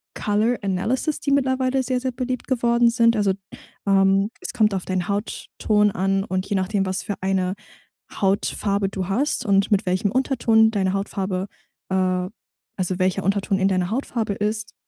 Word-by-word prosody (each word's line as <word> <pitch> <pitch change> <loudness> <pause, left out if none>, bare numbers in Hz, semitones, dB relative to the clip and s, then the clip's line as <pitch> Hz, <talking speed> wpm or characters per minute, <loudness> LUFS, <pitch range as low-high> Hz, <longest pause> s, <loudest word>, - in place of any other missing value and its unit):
Color 215 +4 +1
Analysis, 225 +10 -1
die 280 - -2
mittlerweile 260 -1 +1
sehr, 255 0 -1
sehr 260 0 -2
beliebt 255 0 -4
geworden 235 -2 +3
sind. 230 0 +3
Also, 200 -2 +2 0.5
ähm, 195 +1 +3
es 370 - -5
kommt 215 -2 +2
auf 190 - -3
deinen 185 -2 -2
Hautton 210 0 0
an 195 +1 0
und 185 -1 -2
je 205 - 0
nachdem, 195 +1 0
was 185 0 -2
für 205 - -3
eine 190 -1 0 0.6
Hautfarbe 200 0 0
du 190 -2 -4
hast 255 +5 0
und 195 -1 +2
mit 205 0 +2
welchem 185 +2 0
Unterton 230 -4 +3
deine 190 -3 0
Hautfarbe 195 -1 -2 0.4
äh, 185 -1 +1 0.5
also 185 -1 -1
welcher 185 +1 +1
Unterton 195 +1 0
in 190 - +3
deiner 185 -1 0
Hautfarbe 230 -3 -2
ist, 215 +2 -3
200 Hz, 160 wpm, -23 LUFS, 190-235 Hz, 0.6 s, geworden